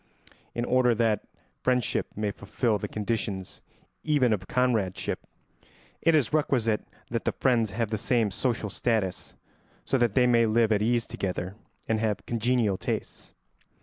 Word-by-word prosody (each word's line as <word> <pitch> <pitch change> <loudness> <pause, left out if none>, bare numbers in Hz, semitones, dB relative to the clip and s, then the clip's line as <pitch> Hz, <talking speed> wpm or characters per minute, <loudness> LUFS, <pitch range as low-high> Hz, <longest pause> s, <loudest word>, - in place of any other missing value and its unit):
In 120 - -1
order 125 -2 +3
that 110 -2 +1 0.4
friendship 125 -2 +1
may 105 -1 -1
fulfil 105 +2 -1
the - - -3
conditions 105 -3 -3 0.4
even 140 -7 +3
of 95 -2 -3
comradeship, 110 -7 0 0.8
it 165 -1 +4
is 150 -3 +2
requisite 120 -8 +1 0.2
that 115 -1 -1
the - - +1
friends 120 -4 +2
have 110 +2 -2
the 110 - -1
same 115 -3 +1
social 110 0 -1
status, 105 -5 -1 0.5
so 135 - +1
that 120 -4 +2
they 125 - +5
may 115 -2 +4
live 110 0 +3
at 105 -1 +3
ease 120 +1 +2
together 90 -1 -3 0.3
and 110 -1 +1
have 105 -3 -1
congenial 115 -4 +1
tastes. - - -5
115 Hz, 150 wpm, -27 LUFS, 105-125 Hz, 0.8 s, they